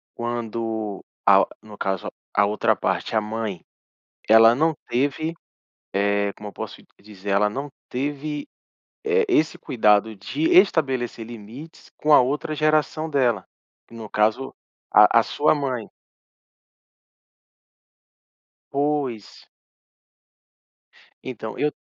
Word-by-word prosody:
quando 115 -3 -4 0.2
a - - +7
o - - 0 0.2
no 105 -1 -12
caso, 95 -3 -2 0.3
a 100 - +5
outra 105 +1 +1
parte, - - -2
a 110 - +3
mãe, 110 -4 -4 0.7
ela 115 +1 +7
não 160 +4 +2
teve, 145 +6 -1 0.6
eh, 100 0 +1
como 105 - -9
eu - - -15
posso - - -7 0.2
dizer, 100 -1 -10
ela 100 +1 +3
não 140 +7 -5 0.2
teve, 145 +3 -3 0.6
eh, 450 +1 +2
esse 155 - +2
cuidado 110 -1 +2
de 105 +10 -5
estabelecer 135 - +3
limites 120 +8 -11
com 155 - +1
a - - +9
outra 145 +4 -1
geração 155 +1 +1
dela, 125 -9 +1 0.5
no 115 -2 -9
caso 110 +5 +1 0.4
a - - +7
a - - +2
sua 150 - +2
mãe. 130 -6 -3 2.8
Pois. 140 -6 -2 1.8
Então 110 -4 -7
eu 150 0 +1
120 Hz, 110 wpm, -23 LUFS, 105-145 Hz, 2.8 s, a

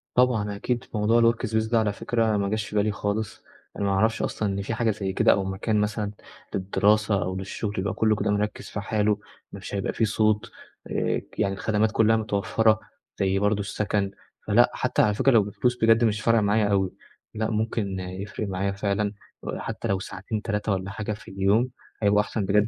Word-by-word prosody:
طبعًا 110 -5 +2
أكيد 120 +4 -2
موضوع 115 +2 +4
الworkspace 110 -1 -1
ده 115 - +4
على 105 -2 +1
فكرة 110 0 0
ما 100 -1 0
جاش 110 0 -2
في 105 - -8
بالي 105 +1 +2
خالص. 105 +1 -3 0.3
أنا 100 - -1
ما 100 - +1
اعرفش 110 +4 +2
أصلًا 105 - -1
إن 100 - -2
في 100 +4 -3
حاجة 115 0 +1
زي 100 -2 -3
كده، - - +4
أو 100 - +2
مكان 95 +3 0
مثلًا 105 -1 -1 0.4
للدراسة 100 +1 +2
أو 95 +1 -3
للشغل 100 +2 -4
يبقى 100 +2 -1
كلّه 110 -1 +2
كده 105 0 0
مِركّز 105 +1 -2
في - - -4
حاله، 105 0 +1 0.3
مش - - -6
هيبقى 100 - -1
في 115 - +2
صوت، 110 0 +1 0.4
آآ - - 0 0.2
يعني 100 -1 +1
الخدمات 105 +2 +1
كلها 110 0 +4
متوفّرة، 110 0 +2 0.4
زي 95 0 +2
برضه 105 +1 +2
السكن. 100 0 -1 0.4
فلأ، - - +5
حتى - - +1
على 105 - +3
فكرة 135 +6 +3
لو 115 -4 +5
بفلوس 110 +5 -1
بجد 115 +1 +5
مش 110 -1 +1
فارقة 115 -1 +3
معايا 105 +1 +2
أويِ 95 -2 +2 0.5
لأ 110 0 -1
ممكن 105 -3 -1
يفرِق 95 +3 -5
معايا 95 +1 -1
فعلًا 100 +1 -1 0.3
آآ - - -4
حتى - - -4
لو 95 -1 +1
ساعتين 100 +3 -5
3 105 0 -1
والّا 95 0 -2
حاجة 105 +1 -3
في 105 0 -11
اليوم، 100 +6 +2 0.3
هيبقوا 105 0 +5
أحسن 105 -1 -3
بجد 105 +2 +3
105 Hz, 195 wpm, -25 LUFS, 100-110 Hz, 0.5 s, فلأ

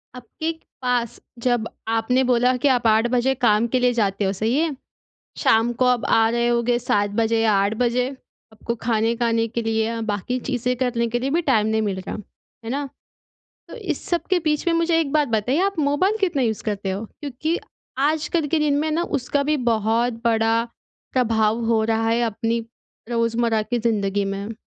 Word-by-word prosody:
आपके 250 +7 -4 0.3
पास, 245 -2 -1 0.2
जब 240 -2 0 0.2
आपने 225 +3 +1
बोला 250 0 +3
कि 280 - +1
आप 245 -3 +2
8 220 +2 +4
बजे 255 +2 +2
काम 235 -2 +3
के 255 - +3
लिए 250 0 +3
जाते 205 -3 0
हो, 190 - +1
सही 220 +7 0
है? 315 -3 0 0.6
शाम 225 +2 +3
को 255 +2 +1
आप 250 -2 +2
आ 225 0 +4
रहे 235 0 +1
होगे 240 0 +2
7 205 -3 +1
बजे 225 0 +2
या 220 -2 +3
8 200 +2 +2
बजे, 245 +1 +1 0.5
आपको 235 +2 -4
खाने 225 0 +1
खाने 230 -1 +1
के 235 +1 -3
लिए, 225 +1 -1
बाक़ी 220 +4 -2
चीज़ें 250 0 -1
करने 240 -2 0
के 240 +1 -1
लिए 265 +2 -2
भी - - +2
टाइम 215 -4 +3
नहीं 220 0 +1
मिल 195 -3 -2
रहा। 190 - -6 0.5
है - - -4
ना? 280 +1 -2 0.8
तो - - -9
इस 370 -10 -4
सब 345 -1 0
के 370 - +4
बीच 300 +2 0
में 335 - +3
मुझे 335 0 +2
एक 290 -3 -2
बात 300 -2 +2
बताइए, 235 - +1
आप 395 -2 -1
मोबाइल 305 +9 +2
कितना 325 -9 +1
यूज़ 220 -3 -1
करते 200 -3 -2
हो? 200 +4 -3 0.2
क्योंकि 295 +4 -2 0.5
आजकल 315 0 0
के 325 - +1
दिन 290 -2 +2
में 310 0 -1
ना, 330 +3 0
उसका 280 -2 -1
भी 300 +1 +1 0.2
बहुत 225 +2 0
बड़ा 225 0 +2 0.5
प्रभाव 225 -2 +1
हो 225 -1 +2
रहा 225 0 +1
है 230 +1 +2
अपनी 230 +1 -1 0.5
रोज़मर्रा 230 -1 +1
की 240 +3 -2
ज़िंदगी 205 -3 0
में। 200 +3 -4
235 Hz, 190 wpm, -22 LUFS, 225-265 Hz, 0.8 s, 8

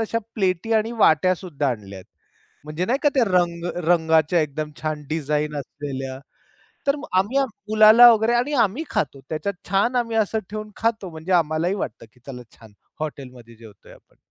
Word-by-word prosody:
तशा 225 +1 -1 0.2
प्लेटी 190 +1 -1
आणि 220 +1 +1
वाट्या 185 -1 +4
सुद्धा 155 -7 -3
आणल्यात. 100 -5 -6 0.6
म्हणजे 155 +4 -3
नाही 255 +4 +1
का 295 - +5
ते 255 -4 +4
रंग 175 -3 0 0.2
रंगाच्या, 160 -1 +3
एकदम 150 0 -3
छान 155 -1 -3
डिझाइन 150 -1 -2
असलेल्या. 135 -2 -6 0.7
तर 280 +1 +2
मग 295 - -8
आम्ही 215 +9 +1 0.3
मुलाला 220 +3 +8
वगैरे 220 +1 +1
आणि 245 +5 0
आम्ही 225 +11 -3
खातो 140 -1 -2
त्याच्यात. 180 +5 -3 0.2
छान 200 +6 +1
आम्ही 230 -2 -1
असं 220 0 +1
ठेवून 215 0 -6
खातो, 220 -5 -1
म्हणजे 160 +3 -5
आम्हालाही 170 +2 +1
वाटतं, 150 - -6
की 125 - -26
चला, 125 -3 -8
छान 110 -2 -17 0.3
हॉटेलमध्ये 125 -6 -8
जेवतोय 110 -3 -16
आपण. - - -21
170 Hz, 165 wpm, -22 LUFS, 150-215 Hz, 0.7 s, मुलाला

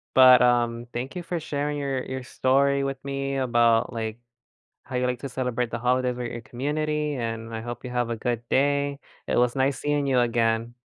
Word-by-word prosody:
But, 130 -1 +8
um, 120 -1 +2
thank 125 +6 -4
you 180 - -3
for 170 0 -3
sharing 145 -1 -2
your 135 -2 -2
your 130 0 -5
story 140 +2 +2
with 135 -1 -4
me 135 0 -2
about, 120 -3 +3
like, 110 -1 -4 0.7
how 130 - -5
you 125 0 +1
like 125 -1 -2
to 140 - -5
celebrate 125 -2 -2
the 120 - -3
holidays 125 +1 +1
with 120 -1 -4
your - - -6
community, 150 +4 -2
and 115 -2 -4
I 110 - -3
hope 120 0 -6
you 125 - -5
have 120 -1 -1
a 115 - -1
good 120 +1 -2
day. 140 +1 +1 0.3
It - - 0
was 125 +1 +2
nice 135 +1 +1
seeing 145 -1 0
you 130 -2 +3
again. 115 0 +1
125 Hz, 205 wpm, -25 LUFS, 120-140 Hz, 0.7 s, But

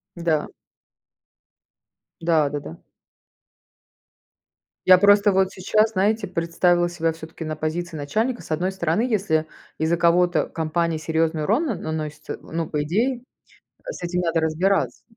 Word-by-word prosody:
Да. 165 -3 0 1.7
Да-да-да. 145 - 0 2.1
Я 185 0 +8
просто 205 +1 +5
вот 190 0 +2
сейчас, 215 +4 +1
знаете, 205 +1 +1
представила 175 0 +1
себя 165 -1 -1
всё-таки 160 0 -9
на 155 - -3
позиции 160 +2 -3
начальника. 220 - -1
С - - -13
одной 180 +4 0
стороны, 170 +1 0
если 190 -10 +1 0.3
из-за 160 +2 +1
кого-то 175 0 +3
компания 165 0 -1
серьезный 160 0 0
урон 235 - +1
на 230 - -1
наносится, 155 -2 -5
э, - - -7
ну, 165 0 -4
по 150 -1 -2
идее, 235 - 0 0.6
с - - -7
этим 180 +1 -1
надо 165 -1 +1
разбираться. 170 +5 0
170 Hz, 125 wpm, -23 LUFS, 160-190 Hz, 2.1 s, Я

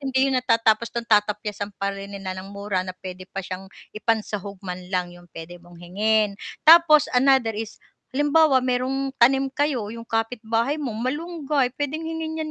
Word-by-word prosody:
hindi 270 0 +1
yun 255 - +2
natatapos 230 -2 +2
dun, 235 - -1
tatapyasan 210 -1 0
pa 200 0 -2
rin 195 0 -8
nila 190 -1 -5
ng 190 - -10
mura 200 -2 -1
na 185 0 -6
p'wede 185 0 -9
pa 195 - -6
siyang 190 0 -7 0.2
ipan-sahog 210 -2 -2
man 180 -1 -5
lang, 180 -2 -2
yung 175 0 -16
pwede 170 +2 -9
mong 175 0 -16
hingin. 205 +4 0 0.3
Tapos, 320 -2 +8
another 255 -2 +4
is, 215 0 -6 0.4
halimbawa 290 -2 +4
may 250 -1 +1 0.4
tanim 270 +2 +4
kayo 270 -8 -1
yung 230 0 -9
kapitbahay 225 +4 -1
mo, 245 -7 -4
malunggay, 290 +2 -1
pwedeng 290 +2 -2
hingin 320 0 -4
'yan 310 -1 -4
225 Hz, 170 wpm, -23 LUFS, 200-270 Hz, 0.4 s, Tapos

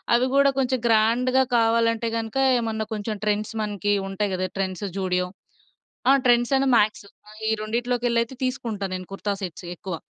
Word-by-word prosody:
అవి 245 - +3
గూడా 280 0 +5
కొంచెం 260 -1 +1
గ్రాండ్‌గా 240 +4 +3
కావాలంటే 230 0 +2
గనుక 225 +2 -4 0.2
ఏమన్నా 220 -2 -2
కొంచెం 215 0 -3
ట్రెండ్స్ 210 +1 -1
మనకి 205 0 -1 0.2
ఉంటాయి 195 +1 -2
గదా! 185 0 -1
ట్రెండ్స్, 190 0 -2
జూడియో. 180 -1 0 0.8
ఆ! - - +7
ట్రెండ్సను 245 +3 +3
మ్యాక్స్. 210 -1 +1 0.4
ఈ - - +2
రెండిట్లోకెళ్ళైతే 240 +1 -1
తీసుకుంటా 230 -6 -3
నేను 185 -1 -7
కుర్తా 200 +1 -2
సెట్స్ 180 0 -6
ఎక్కువ. 185 0 -5
225 Hz, 145 wpm, -24 LUFS, 205-240 Hz, 0.8 s, ఆ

